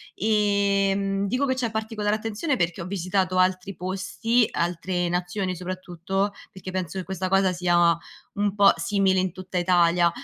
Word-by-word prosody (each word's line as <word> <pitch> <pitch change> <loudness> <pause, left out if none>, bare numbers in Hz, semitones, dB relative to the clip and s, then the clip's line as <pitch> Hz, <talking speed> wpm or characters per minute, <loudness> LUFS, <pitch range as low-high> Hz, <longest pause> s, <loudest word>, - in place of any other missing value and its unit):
Ehm, 200 -1 +1
dico 255 +7 0
che 260 -1 0
c'è 245 -3 -2
particolare 215 -1 -1
attenzione 225 +7 -2
perché 170 -7 -1
ho 170 - -5
visitato 185 0 -1
altri 185 +1 +1
posti, 195 +6 0
altre 175 +1 -1
nazioni 180 +1 -2
soprattutto, 185 +2 -3 0.2
perché 190 0 -8
penso 185 -1 -3
che - - -4
questa 190 0 -3
cosa 195 0 +3
sia 175 -2 +3 0.4
un 205 0 -1
po' 200 -1 +7
simile 190 +2 +2
in 185 -2 -1
tutta 185 0 -6
Italia; 175 -1 +3
190 Hz, 150 wpm, -25 LUFS, 180-200 Hz, 0.4 s, po